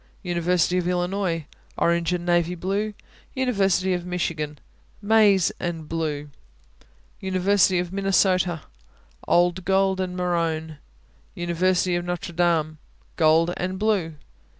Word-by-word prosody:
University 175 0 +1
of 175 - -2
Illinois 180 -2 -1 0.3
Orange 170 0 +1
and 175 -1 -2
navy 175 0 +1
blue. 200 +4 -2 0.4
University 195 -8 +1
of 175 -1 -2
Michigan 160 -4 -3 0.4
Maize 205 -3 +4
and 165 -3 -4
blue. 150 -3 -3 0.9
University 190 0 +2
of 175 +1 -2
Minnesota 190 -3 +1 0.6
Old 175 +1 +2
gold 190 0 +2
and 180 -1 -4
maroon. 165 -3 -1 0.6
University 180 +1 +1
of 175 - -1
Notre 175 0 -4
Dame 165 -3 +1 0.4
Gold 165 +1 +3
and 185 +1 -3
blue. 195 -6 0
180 Hz, 110 wpm, -24 LUFS, 170-190 Hz, 0.9 s, Maize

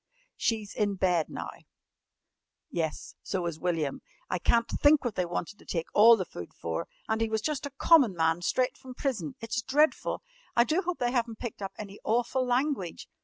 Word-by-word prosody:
She's 220 -3 -1
in 205 -2 0
bed 180 -4 +1
now - - -5 0.7
" - - -57 0.3
"Yes, 160 -3 -3
so 185 -3 -2
is 165 -2 -3
William. 165 -6 -1 0.3
I 180 - 0
can't 235 +5 +3
think 290 -1 +4
what 240 - 0
they 180 -2 -1
wanted 175 +3 -4
to - - -17
take 165 -2 -2
all 225 +2 +8
the 185 - -2
food 85 - -9
for. 80 -1 -3 0.2
And 220 0 0
he 225 - +1
was 220 0 0
just 295 +2 -2
a 275 -1 -15
common 270 - +5
man 165 +1 +2
straight 250 +8 0
from 255 -1 -10
prison. 215 - -2
It's 230 +1 -2
dreadful. 300 - +1 0.3
I 235 - +6
do 310 +10 +1
hope 355 -1 -2
they 245 -1 0
haven't 235 -3 -1
picked 235 -3 -6
up 195 - -4
any 200 -1 -8
awful 240 +3 +1
language. 250 - -1
220 Hz, 195 wpm, -29 LUFS, 180-250 Hz, 0.7 s, all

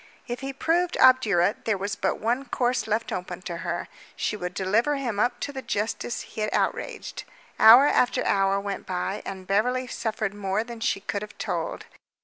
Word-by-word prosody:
If 240 -1 -4
he 270 0 -4
proved 335 +6 0
obdurate 210 -8 +4
there 220 -3 +1
was 200 +1 -3
but 200 - -1
one 245 +5 0
course 245 -2 0
left 220 +1 -1
open 180 0 -5
to 175 -3 -5
her. 175 0 -3 0.3
She - - -1
would 180 -3 -5
deliver 220 +10 +1
him 240 -7 -3
up 245 +2 +1
to 285 - -3
the 265 - -5
justice 220 +1 -2
he 220 - -8
had 215 - 0
outraged. - - -2 0.4
Hour 235 +5 +9
after 250 -4 +2
hour 195 0 +2
went 200 0 -5
by, 185 +2 -2
and 190 -1 -6
Beverly 245 +7 +1
suffered 220 -4 -3
more 205 +1 -1
than 235 -1 -9
she 195 -3 0
could 200 0 -3
have 210 0 -9
told. - - -3
215 Hz, 185 wpm, -26 LUFS, 195-245 Hz, 0.4 s, Hour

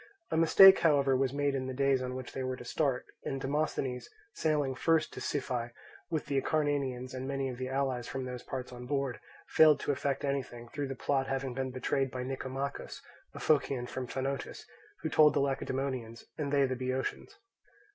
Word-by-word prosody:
A - - +1
mistake, 190 +4 +8
however, 140 -4 +4
was 130 -1 +1
made 145 0 0
in 130 -1 -2
the 130 - -4
days 135 -1 +2
on 125 0 -3
which 130 -1 -7
they 135 - -3
were 130 0 -2
each - - -12
to - - -9
start; 135 -1 0 0.2
and 135 - -3
Demosthenes, 135 -3 -2 0.2
sailing 150 -4 +1
first 160 +4 +1
to - - -7
Siphae, 125 -4 -2 0.4
with 160 -3 -1
the 140 -1 +1
Acarnanians 140 -5 -1
and 130 0 -4
many 135 -1 -1
of 125 -1 -7
the 130 0 -3
allies 130 -3 -1
from 135 -1 -4
those 125 -1 -5
parts 125 0 -6
on 125 0 -8
board, 140 -2 -1 0.3
failed 155 -2 +6
to - - 0
effect 140 0 -1
anything, 125 -4 -3
through 145 +1 -3
the 135 - -4
plot 135 +1 0
having 135 -1 -2
been 130 +1 -2
betrayed 130 +1 -1
by 125 0 -4
Nicomachus, 135 +1 -4 0.4
a - - -6
Phocian 140 -4 +1
from 125 0 -5
Phanotis, 135 +1 -4 0.4
who - - 0
told 150 -1 +5
the - - +3
Lacedaemonians, 130 -4 -2
and 145 -2 -3
they 140 -1 +4
the 130 -1 -1
Boeotians. 130 - -3
135 Hz, 195 wpm, -31 LUFS, 130-140 Hz, 0.4 s, mistake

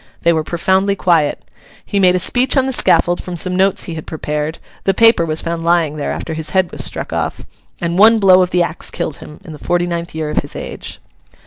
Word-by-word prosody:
They 170 - +4
were 160 -1 0
profoundly 190 +4 0
quiet. 165 -7 +1 0.4
He 200 - -1
made 180 -2 +4
a - - +3
speech 250 +9 +2
on 265 - +3
the 265 - -2
scaffold 175 -7 +2
from 180 -1 -7
some 180 +2 +1
notes 190 +1 +2
he 170 - -4
had 160 -1 -8
prepared 150 0 -4 0.3
(the 195 - +1
paper 225 -6 +4
was 155 0 -1
found 170 0 -3
lying 165 -3 +1
there 145 - -3
after 160 - -5
his 160 -1 -5
head 185 -2 +1
was - - -3
struck - - -4
off), - - -3 0.3
and 170 +1 -2
one 225 +2 +7
blow 190 -3 +5
of 180 - +1
the 180 -1 +2
axe 170 -1 -3
killed 155 - -4
him, 150 - -12
in 160 - -9
the 150 - -11
forty 175 0 0
ninth 170 -1 -5
year 155 -1 -3
of - - -6
his - - -8
age. - - -7
175 Hz, 235 wpm, -16 LUFS, 160-190 Hz, 0.4 s, one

